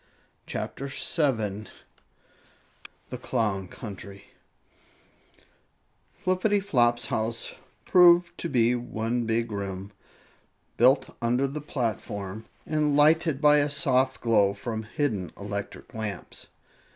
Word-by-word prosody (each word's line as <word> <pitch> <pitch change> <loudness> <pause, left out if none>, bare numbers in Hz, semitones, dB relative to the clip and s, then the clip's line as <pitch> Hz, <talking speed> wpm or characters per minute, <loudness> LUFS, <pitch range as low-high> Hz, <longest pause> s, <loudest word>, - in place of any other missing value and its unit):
CHAPTER 140 +1 -5
7 115 - -1 1.4
THE 125 - -5
CLOWN 105 -7 -1
COUNTRY 100 -1 -10 1.9
Flippityflop's 185 - +2
house 115 +1 -2 0.3
proved 175 -1 +6
to 170 - -3
be 120 -3 +3
one 120 -1 -2
big 115 0 0
room, 100 -1 -5 0.9
built 130 +4 +4
under 120 +3 +2
the 145 +2 -4
platform, 110 -6 -4 0.2
and 150 -2 +1
lighted 155 0 +4
by 150 0 +6
a 145 0 +2
soft 135 -3 +1
glow 105 -4 +3
from 110 +2 -4
hidden 110 - -2
electric 100 0 -6
lamps. 105 -4 -6
120 Hz, 95 wpm, -27 LUFS, 105-145 Hz, 1.9 s, proved